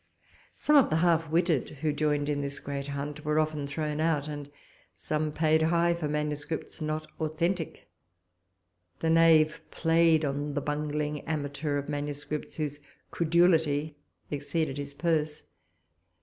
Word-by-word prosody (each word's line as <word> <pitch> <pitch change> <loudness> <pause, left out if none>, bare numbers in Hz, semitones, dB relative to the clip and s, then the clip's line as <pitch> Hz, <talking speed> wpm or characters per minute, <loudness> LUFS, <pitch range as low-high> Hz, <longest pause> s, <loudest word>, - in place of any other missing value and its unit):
Some 300 - +2
of 275 - +5
the 155 - +1
half 165 -1 +3
witted, 165 -3 +2
who 155 -2 +2
joined 145 -1 0
in 145 -1 0
this 140 0 -4
great 140 0 -5
hunt, 145 +1 -5
were 150 0 +1
often 155 -2 -1
thrown 150 +1 -3
out, 155 -2 +1
and 145 -1 -6 0.5
some 155 0 -1
paid 160 +1 +2
high 170 +1 +3
for 170 -3 -3
manuscripts 150 +2 -3
not 155 0 -2
authentic; 165 +2 -2 1.1
the 160 - 0
knave 165 -1 +5
played 165 -1 +3
on 145 +1 -2
the - - +2
bungling 150 0 -2
amateur 145 -1 -2
of 140 - -4
manuscripts, 145 +1 -4
whose 145 -2 -3 0.3
credulity 160 -3 +2 0.4
exceeded 145 0 -2
his 140 0 -6
purse. 155 -2 0
150 Hz, 135 wpm, -29 LUFS, 145-160 Hz, 1.1 s, of